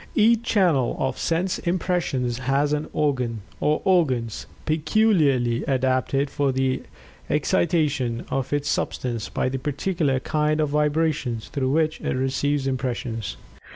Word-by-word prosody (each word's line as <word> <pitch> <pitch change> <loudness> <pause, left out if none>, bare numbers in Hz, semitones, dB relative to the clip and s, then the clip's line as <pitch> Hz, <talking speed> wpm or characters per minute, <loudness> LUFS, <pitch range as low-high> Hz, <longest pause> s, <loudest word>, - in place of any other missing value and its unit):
Each 225 +1 +4
channel 180 - +2
of 130 -1 -2
sense 175 +3 0
impressions 170 -9 -1
has 135 +3 +1
an 150 0 -1
organ, 125 -7 0 0.2
or 150 +1 +1
organs, 130 - +1 0.2
peculiarly 155 - +2
adapted 130 +1 +1
for 140 -2 +1
the 130 0 0 0.5
excitation 150 -6 +1
of 135 -1 -2
its 145 0 0
substance 120 -3 -2
by - - -1
the 130 +1 -2
particular 145 0 0
kind 150 +2 0
of 150 -2 +1
vibrations 150 -5 0
through 130 -3 -1
which 155 +2 +1
it - - -1
receives 135 +2 0
impressions. 125 -4 -3
140 Hz, 125 wpm, -24 LUFS, 130-155 Hz, 0.5 s, Each